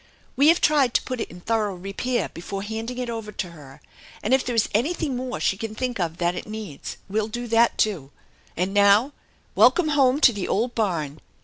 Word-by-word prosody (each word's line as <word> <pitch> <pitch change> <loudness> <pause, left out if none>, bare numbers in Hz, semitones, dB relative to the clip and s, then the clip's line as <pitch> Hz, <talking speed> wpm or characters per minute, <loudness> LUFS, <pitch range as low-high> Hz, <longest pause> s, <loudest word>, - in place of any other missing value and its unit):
We 280 +3 +4
have 335 +2 +6
tried 285 -5 +3
to - - +3
put 255 -2 -4
it - - -4
in 175 +1 -12
thorough 215 -2 0
repair 195 +7 -2
before 195 +3 -6
handing 225 +4 -5
it 250 -1 -3
over 225 -2 -5
to 180 -3 -4
her, 145 -3 -14 0.4
and 220 - +1
if 265 - +4
there 245 - -3
is 225 - +3
anything 280 +4 0
more 255 0 -4
she 195 - +1
can 220 +1 -5
think 250 -1 -3
of 170 -2 -2
that 175 0 +1
it - - -6
needs 215 -9 -7
we'll 210 +2 -1
do 240 +2 -5
that 230 +1 +3
,',oo. 180 -11 0 0.5
And 185 +3 -1
now, 205 +7 +4 0.4
welcome 345 -4 +4
home 275 -2 +3
to 245 - +6
the 200 -3 -4
old 235 +4 0
barn! 165 -9 -2
220 Hz, 210 wpm, -24 LUFS, 195-250 Hz, 0.5 s, have